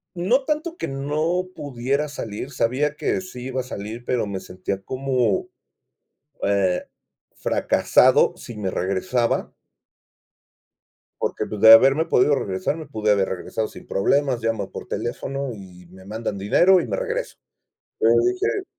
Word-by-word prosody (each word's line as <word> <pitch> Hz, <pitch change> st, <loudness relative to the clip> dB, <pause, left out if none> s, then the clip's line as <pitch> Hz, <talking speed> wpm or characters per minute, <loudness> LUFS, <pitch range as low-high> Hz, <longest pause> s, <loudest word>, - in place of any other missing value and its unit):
No 235 Hz, +11 st, +1 dB
tanto 315 Hz, +3 st, -2 dB
que -, -, -3 dB
no 155 Hz, +6 st, -1 dB
pudiera 140 Hz, +1 st, -2 dB
salir, 125 Hz, -3 st, -6 dB
sabía 140 Hz, +4 st, 0 dB
que 150 Hz, -, -1 dB
sí 130 Hz, -10 st, -8 dB
iba 130 Hz, 0 st, -3 dB
a -, -, -1 dB
salir, 115 Hz, 0 st, -7 dB
pero 125 Hz, -3 st, 0 dB
me 100 Hz, -2 st, -4 dB
sentía, 95 Hz, +1 st, -5 dB
como, 130 Hz, -, -1 dB, 0.9 s
eh, 95 Hz, -3 st, +1 dB, 0.5 s
fracasado -, -, +3 dB
si 120 Hz, -, -9 dB
me 100 Hz, -3 st, -2 dB
regresaba. 100 Hz, +7 st, -1 dB, 1.7 s
Porque, -, -, -2 dB
pues, 105 Hz, -2 st, -6 dB
de 110 Hz, 0 st, +10 dB
haberme 135 Hz, +7 st, +6 dB
podido 145 Hz, -3 st, +3 dB
regresar, 95 Hz, +2 st, -2 dB
me 160 Hz, -1 st, -8 dB
pude 110 Hz, -1 st, 0 dB
haber 100 Hz, -2 st, +2 dB
regresado 110 Hz, +4 st, -3 dB
sin -, -, -13 dB
problemas, 130 Hz, +5 st, +1 dB
llamo 110 Hz, -3 st, -1 dB
por -, -, -8 dB
teléfono 135 Hz, +3 st, -3 dB
y 90 Hz, -4 st, -13 dB
me 95 Hz, +2 st, -15 dB
mandan 105 Hz, 0 st, -4 dB
dinero, 175 Hz, -, +4 dB
y -, -, -5 dB
me -, -, -2 dB
regreso. -, -, -3 dB, 0.6 s
Entonces 370 Hz, +1 st, +4 dB
dije 395 Hz, 0 st, -1 dB
125 Hz, 145 wpm, -23 LUFS, 100-150 Hz, 1.7 s, de